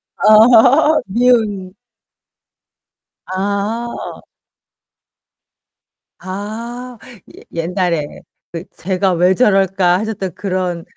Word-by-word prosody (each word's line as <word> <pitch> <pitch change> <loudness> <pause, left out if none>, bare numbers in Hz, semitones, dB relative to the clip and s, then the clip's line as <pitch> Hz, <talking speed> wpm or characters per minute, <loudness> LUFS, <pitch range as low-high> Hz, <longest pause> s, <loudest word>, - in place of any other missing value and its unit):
아 245 +8 +5
미운 210 -4 0 1.5
아. 205 +5 -4 1.9
아. 230 +6 -7 0.4
옛 - - -15
옛날에 170 -2 -1 0.5
그 165 0 -6
"쟤가 185 +1 -1
왜 180 +2 +2
저럴까."하셨던 195 -2 +1
그런 185 -3 -3
195 Hz, 115 characters per minute, -16 LUFS, 185-230 Hz, 1.9 s, 아